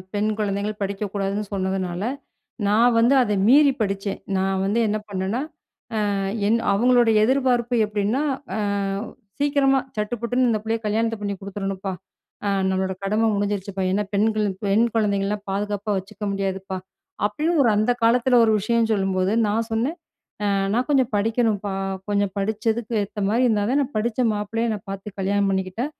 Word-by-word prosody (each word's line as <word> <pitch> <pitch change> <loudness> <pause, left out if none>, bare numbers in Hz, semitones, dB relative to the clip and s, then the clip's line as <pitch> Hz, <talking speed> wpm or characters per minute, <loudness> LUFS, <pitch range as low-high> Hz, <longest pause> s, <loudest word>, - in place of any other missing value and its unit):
பெண் 210 +1 +1
குழந்தைகள் 205 0 -2
படிக்கக்கூடாதுன்னு 200 +1 -2
சொன்னதுனால, 190 -1 -2 0.7
நான் 230 +3 +4
வந்து 240 +4 +5
அத 210 -4 0 0.2
மீறி 285 +2 +6
படிச்சேன். 195 -1 -2 0.2
நான் 190 0 0
வந்து 205 +4 +1
என்ன 215 +1 0
பண்ணன்னா, 195 +4 -2 0.7
அ - - 0 0.3
என் 230 - +3
அவுங்களுடைய 240 +2 +4
எதிர்பார்ப்பு 250 -2 +2
எப்பிடின்னா, 210 +6 0 0.3
அ - - -2 0.8
"சீக்கிரமா 280 -2 +3 0.2
சட்டு 210 +2 -1
புட்டுன்னு 245 +1 +2
இந்த 220 - +1
பிள்ளைய 225 0 -1
கல்யாணத்த 225 +2 0
பண்ணி 200 -1 -2
குடுத்துறணுப்பா! 195 -1 -4 0.5
ஆ - - +2 0.2
நம்மளோட 190 0 -1
கடமை 215 +3 +1
முடிஞ்சிடுச்சிப்பா! 200 -1 -2
ஏன்னா, 205 +1 +1
பெண்கள் 215 0 +2 0.2
பெண் 210 +4 +4
குழந்தைங்கள்லாம் 205 -1 0
பாதுகாப்பா 205 +1 -2
வச்சுக்க 200 +2 -10
முடியாதுப்பா," 195 -1 -3 0.5
அப்பிடின்னு 305 +9 0
ஒரு 235 - +4
அந்த 215 +4 +3
காலத்தில 245 +2 +4
ஒரு 220 - +3
விஷயம் 230 +1 +1
சொல்லும்போது 190 -1 0 0.2
நான் 225 +2 0
சொன்னேன். 255 +10 -1 0.5
'அ - - +1 0.3
நான் 245 +2 +1
கொஞ்சம் 265 -4 +3
படிக்கணும்ப்பா! 210 -2 0 0.4
கொஞ்சம் 200 -1 +1
படிச்சக்கு 220 +3 -1
ஏத்தமாதரி 210 +4 0
இருந்தா 210 -2 +1
தான் 280 +3 +3
நான் 275 +1 -6
படிச்ச 235 +2 -1
மாப்பிள்ளையா 225 +3 -2
என்ன 215 - -2
பார்த்து 195 +1 -7
கல்யாணம் 200 +1 +1
பண்ணிக்கிட்டா, 190 +6 -2
210 Hz, 145 wpm, -23 LUFS, 195-230 Hz, 0.8 s, மீறி